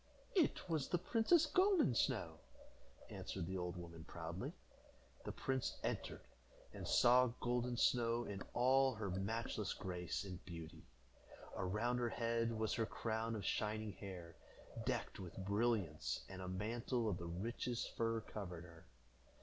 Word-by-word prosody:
"It 345 - +3
was 160 -5 0
the 175 - +2
princess 230 - +4
Golden 365 - +4
Snow," - - +1 0.7
answered - - -4
the 95 +2 -2
old 90 0 -3
woman, 85 -2 -8
proudly. 85 +2 -4 0.7
The - - -2
prince 130 -1 -1
entered, - - -2 0.5
and - - -5
saw 125 +1 +7
Golden 125 0 0
Snow 120 -1 +3
in 100 -1 -4
all 130 +1 +5
her 105 -3 -2
matchless 105 +2 -1
grace 90 0 -2
and 95 -3 -7
beauty. 85 -2 -8 0.7
Around 105 +7 +1
her 120 -1 +1
head 115 0 +1
was 110 -1 +1
her 115 -2 +1
crown 115 0 -1
of 105 - -4
shining 110 0 0
hair, 90 -4 -8 0.5
decked - - -1
with 90 -3 -7
brilliants, 100 -6 +1
and 95 -1 -7
a 90 - -4
mantle 115 +5 -1
of 100 -5 0
the 85 - -4
richest 115 +7 -2
fur 115 -1 +1
covered 90 -6 -6
her. 85 -2 -14
110 Hz, 140 wpm, -40 LUFS, 90-120 Hz, 0.7 s, saw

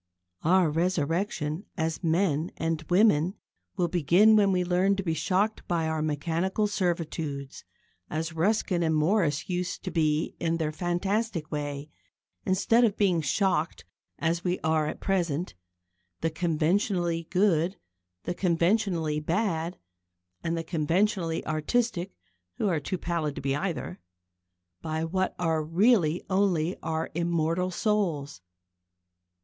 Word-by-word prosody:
Our 175 -1 +4
resurrection 165 +1 -1
as 160 +1 -2
men 165 -1 +1
and 165 -1 -1
women 185 -2 +4 0.4
will 175 -2 +2
begin 180 +6 +5
when 200 -2 +4
we 180 -1 +2
learn 180 +3 +2
to 195 - -3
be 165 -3 0
shocked 200 +6 0
by 165 -2 0
our 160 -1 -1
mechanical 165 +7 0
servitudes, 165 -8 -3 0.5
as 160 +2 -3
Ruskin 180 +1 +1
and 160 -1 +2
Morris 155 -2 +1
used 180 -1 -3
to - - -4
be 155 -1 0
in 165 0 0
their 155 -2 -1
fantastic 175 +1 -1
way, 145 0 -4 0.6
instead 200 +5 +3
of 220 -3 +2
being 185 -5 +2
shocked, 165 +1 0 0.3
as 170 +1 -1
we 180 0 0
are 160 -1 +2
at - - -5
present 175 -3 -1 0.7
the 165 - 0
conventionally 170 +1 0
good, 185 -2 +2 0.5
the - - -2
conventionally 170 -3 +1
bad, 170 +1 -1 0.7
and 165 0 -1
the 165 - -2
conventionally 170 +1 0
artistic 175 +5 -1 0.4
who 210 - -1
are 170 -5 +1
too 180 +6 -3
pallid 165 -5 -2
to - - -5
be 135 0 0
either 155 - -3 0.8
by 160 +6 -2
what 185 +3 -1
are 165 -2 +1
really 175 0 +3
only 185 -3 +1
our 160 0 -2
immortal 170 +1 0
souls. 170 - -1
170 Hz, 130 wpm, -27 LUFS, 160-190 Hz, 0.8 s, begin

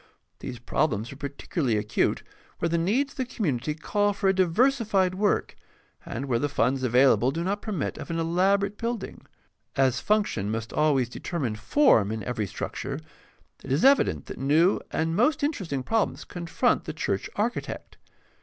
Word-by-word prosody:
These 125 - -6
problems 120 -2 -1
are - - -11
particularly 140 -3 -2
acute 105 0 0 0.3
where - - 0
the 170 - 0
needs 245 +12 +1
of - - -25
the 260 - -1
community 150 - -2
call 205 +6 0
for 200 0 -1
a - - +4
diversified 195 0 +2
work, 200 +2 0 0.5
and 130 - -4
where 120 -4 0
the 145 - 0
funds 130 0 +1
available 125 -1 +4
do 165 +5 -2
not 200 +3 -1
per 215 - -5
mit 175 -8 -3
of - - -8
an 165 - -2
elaborate 195 +5 +1
building. 230 -2 -4 0.5
As 130 -2 +2
function 205 - 0
must 110 0 -4
always 145 -5 +2
determine 125 -2 -3
form 110 - +3
in 110 -1 -4
every 110 -2 -2
structure, 135 +7 -5 0.6
it 135 - -7
is 140 - +2
evident 275 +1 +4
that - - -8
new 155 +7 +3
and 165 +1 -1
most 290 - +2
interesting 190 - -2
problems 225 - 0
confront 170 -1 0
the - - -4
church 95 - -2
architect. 230 +4 -3
165 Hz, 165 wpm, -26 LUFS, 130-205 Hz, 0.6 s, a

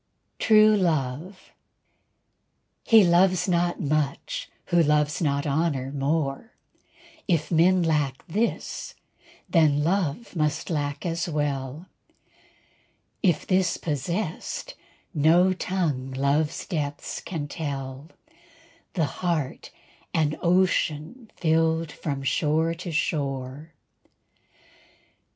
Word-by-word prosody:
_" - - -48
TRUE 215 -1 +6
LOVE 165 +1 -2 1.3
He 225 -2 +7
loves 180 +1 +4
not 175 -1 +1
much 155 - -2 0.2
who 175 -1 +3
loves 150 -1 +2
not 140 -3 0
honor 140 -3 0
more; 145 - -2 0.7
If 165 -4 0
men 175 +2 +4
lack 150 -5 0
this 215 +7 -2 0.5
then 150 -4 +3
love 180 +3 -1
must 150 +1 -1
lack 145 -1 -2
as 170 0 -2
well; 145 0 -2 1.4
If 175 -6 +2
this 185 -2 +2
possessed 160 +4 -3 0.4
no 170 +5 +4
tongue 165 -9 -2
love's 140 +3 0
depths 145 -4 -4
can 155 -5 -4
tell; 140 -2 -5 0.9
The 165 -4 +2 0.2
heart 165 -7 -2 0.5
an 155 -1 +2
ocean 185 - +1
filled 160 -1 +1
from 140 -3 -4
shore 155 +4 +1
to 175 +1 -6
shore. 140 -1 -2
160 Hz, 95 wpm, -25 LUFS, 145-175 Hz, 1.4 s, He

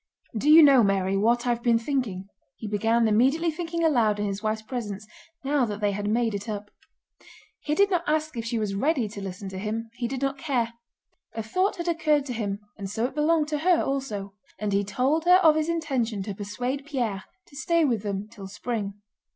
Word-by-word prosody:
"Do 250 +8 +1
you 320 +1 +10
know, 275 -4 +7
Mary, 195 -2 +1
what 235 +5 +2
I've 240 -1 0
been 235 -1 +3
thinking?" 230 -7 -2 0.3
he 220 - -7
began, 225 +2 +2
immediately 270 +10 +3
thinking 335 +1 -3
aloud 230 -10 +3
in 210 - 0
his 200 0 -3
wife's 215 0 -2
presence 215 -4 -5 0.4
now 280 0 +1
that 210 -2 -5
they 205 -1 +1
had 205 +1 -3
made 230 0 +1
it 205 +2 -5
up. 205 -1 -5 0.9
He 300 - -2
did 400 +2 +3
not 350 -2 +1
ask 310 -1 0
if 230 - -3
she 230 +1 -2
was 210 -3 -1
ready 260 +3 +1
to 205 -1 -8
listen 195 0 -6
to 190 0 -6
him. 225 +2 -4
He 240 0 -3
did 265 +1 -4
not 275 0 -1
care. 245 -6 -1 0.6
A 225 - -3
thought 370 - 0
had 345 -1 -5
occurred 310 -4 +2
to 255 - -4
him 205 -3 -3 0.2
and 195 -1 -5
so 220 +4 -1
it 260 - -3
belonged 305 +1 +2
to 300 -1 -1
her 350 +2 +3
also. 215 -8 -3 0.2
And 210 -1 -2
he 200 +1 +2
told 260 - 0
her 360 +1 +7
of 315 -2 +6
his 310 +1 0
intention 260 -11 -1
to 205 0 -5
persuade 245 +8 -4
Pierre 240 -9 -2 0.2
to - - -17
stay 335 +2 +2
with 235 -7 0
them 200 0 -3
till 210 -3 -10
spring. 205 0 -4
235 Hz, 215 wpm, -26 LUFS, 205-295 Hz, 0.9 s, you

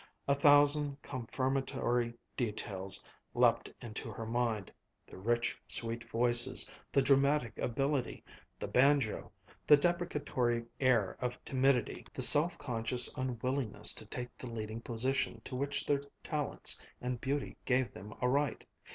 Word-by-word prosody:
A 140 - +4
thousand 145 0 +4
confirmatory 130 -1 -2 0.2
details 105 -4 -1 0.3
leaped 120 -1 +3
into 115 +1 -5
her 110 +1 -6
mind: 115 -3 -2 0.3
the - - -12
rich, 115 +4 0
sweet 115 0 -2
voices 120 +1 +4 0.2
the 135 +1 +3
dramatic 140 -2 +2
ability 135 +1 -1 0.3
the - - -5
banjo 135 -3 +2 0.4
the 150 - +8
deprecatory 145 -8 -1
air 120 -7 +2
of 125 0 -2
timidity 130 -3 0
the - - -1
self 160 +4 +6
conscious 120 -3 +1
unwillingness 130 -1 -1
to - - -7
take 125 0 -6
the 125 - -7
leading 110 0 -5
position 120 0 -1
to 130 - -6
which 140 +2 -1
their 140 -1 +1 0.2
talents 150 -3 -1 0.2
and 125 -1 -4
beauty 140 +1 -2
gave 130 0 +1
them 105 +3 -10
a 125 - +2
right. 140 +1 0
125 Hz, 130 wpm, -33 LUFS, 115-140 Hz, 0.4 s, the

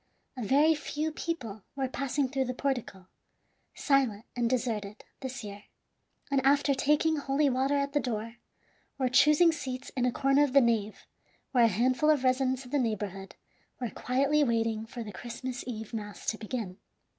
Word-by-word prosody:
A 255 - -6
very 285 +8 +4
few 305 +1 -3
people 250 -11 -4
were 270 -1 -1
passing 275 +1 -1
through 265 0 -1
the 255 0 -4
portico, 245 -9 -3 0.7
silent 255 -7 +1
and 240 -1 +1
deserted, 225 -5 -2 0.2
this 260 -2 -6
year, 205 0 -9 0.7
and 275 -1 +2
after 280 +1 +4
taking 300 +3 +2
holy 280 0 +1
water 265 +3 +1
at 280 0 -1
the 290 - +3
door, 230 -2 -4 0.6
were 260 -2 +1
choosing 300 +6 +5
seats 260 -5 -5
in 250 -1 +1
a - - +1
corner 275 +3 +3
of 280 -3 0
the 280 - +8
nave, 225 -4 0 0.5
where 245 -3 +5
a - - +6
handful 255 +8 +2
of 295 -4 +3
residents 260 0 +1
of 245 - -12
the 290 - +2
neighborhood 205 -5 -3 0.4
were 245 -3 -3
quietly 275 +4 +1
waiting 225 -3 0
for 240 0 -6
the 210 - -8
Christmas 245 +4 -6
Eve 220 -2 -6
mass 210 -2 -6
to 220 - -9
begin. 215 -4 -5
255 Hz, 170 wpm, -29 LUFS, 225-275 Hz, 0.7 s, the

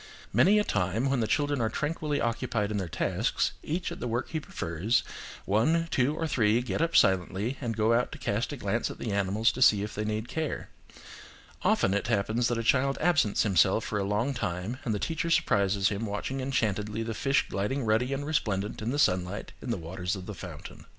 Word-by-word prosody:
Many 205 +3 +5
a 210 - +4
time 105 - 0
when 135 - +1
the 110 - 0
children 145 -1 +1
are 110 - +1
tranquilly 150 +2 -2
occupied 115 -2 -1
in 105 - -1
tasks, - - 0
each 170 +3 -3
at - - -7
the - - -3
work 120 +2 -2
he 160 - -2
prefers, 100 - -1 0.4
one, 160 +12 +2
two, 135 +4 +2
or 165 - -2
three, 115 -6 +2
get 125 - -2
up 165 0 0
silently, 95 +6 +2
and 115 -4 -3
go 110 +1 +3
out 120 +1 +1
to - - -7
cast 110 +7 -1
a 145 - -5
glance 110 0 -1
at - - -8
the 115 - -4
animals 100 +3 +2
to 130 - -7
see 105 -5 +6
if 105 - -5
they 105 - -3
need 110 +2 -2
care. 155 +3 -3 0.9
Often 95 - +2
it 100 - -1
happens 110 +2 +1
that 120 - 0
a 115 - -2
child 135 +3 +2
absents 155 -11 +3
himself 100 +1 +3
for 105 - -2
a - - 0
long 105 +7 0
time 90 +1 -3
and 110 -4 -1
the - - 0
teacher 165 - -2
surprises 100 - +2
him 105 +2 -3
watching 115 +6 -3
enchantedly 110 -4 -1
the 115 0 -3
fish 135 +5 +1
gliding 115 +8 -2
ruddy 110 +4 +2
and 140 +1 -2
resplendent 105 -11 -1
in 110 - -2
the 140 - -1
sunlight 90 -6 +1
in - - -6
the 115 - 0
waters 90 +3 -3
of 95 -2 -7
the 105 - -6
fountain. 90 -6 -9
110 Hz, 210 wpm, -28 LUFS, 100-135 Hz, 0.9 s, see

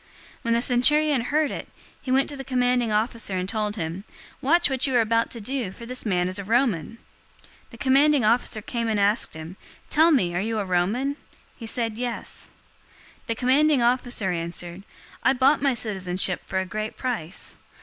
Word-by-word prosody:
022:026 - - -29 0.3
When 230 - 0
the 235 - +2
centurion 285 +3 +4
heard 300 +2 +1
it, - - -6 0.3
he - - -8
went 265 +1 +3
to 290 - -6
the 270 - -7
commanding 250 -2 +1
officer 215 -2 0
and 185 0 -2
told 210 0 -2
him, 170 0 -4 0.4
"Watch 340 +6 +4
what 265 0 +1
you 260 - -1
are - - +5
about 230 +1 +2
to 235 - -7
do, 240 -2 -3
for 235 +4 -11
this 250 -1 -1
man 180 -3 +1
is 185 +2 -2
a - - -4
Roman!" 225 - 0 0.7
022:027 - - -34
The - - -13
commanding 275 -1 +3
officer 225 -1 +1
came 235 0 -3
and 215 -2 0
asked 200 -3 +1
him, 160 +4 -9 0.3
"Tell 320 +3 +5
me, 195 - +2
are 175 - 0
you 225 +2 -2
a 205 - -1
Roman?" 210 +11 0 0.4
He 230 - -9
said, 225 -1 -2
"Yes." 245 -2 -4 0.8
022:028 - - -32
The 230 - -1
commanding 275 +3 +3
officer 240 -5 +1
answered, 170 +2 -4 0.4
"I - - +3
bought 270 +3 +3
my 275 -3 +2
citizenship 190 -5 +1
for 190 - -3
a 190 - 0
great 215 +3 -5
price." 220 -9 -4
230 Hz, 195 wpm, -24 LUFS, 195-260 Hz, 0.8 s, are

